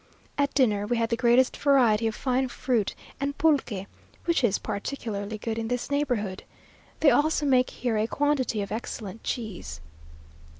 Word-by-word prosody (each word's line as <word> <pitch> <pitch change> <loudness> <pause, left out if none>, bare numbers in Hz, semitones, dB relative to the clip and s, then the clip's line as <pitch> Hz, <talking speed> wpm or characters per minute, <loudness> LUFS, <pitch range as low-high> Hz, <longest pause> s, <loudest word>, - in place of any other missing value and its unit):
At 285 -1 0
dinner 210 -7 +2
we 240 +1 0
had 230 0 0
the - - +3
greatest 245 +2 +3
variety 240 -6 +4
of 220 - -2
fine 260 0 0
fruit, 245 -4 -1 0.2
and 280 +1 -2
pulque, 270 -11 +1 0.4
which 335 -5 +2
is 210 -4 +3
particularly 215 -1 -4
good 225 +1 -3
in 225 - -3
this 245 +3 -3
neighbourhood. 240 -10 -1 0.6
They 290 - +6
also 295 +4 +2
make 255 -2 +3
here 240 -3 -2
a 215 - +1
quantity 270 -6 0
of 200 - -8
excellent 220 -1 -5
cheese. 185 - -4
240 Hz, 160 wpm, -27 LUFS, 215-275 Hz, 0.6 s, They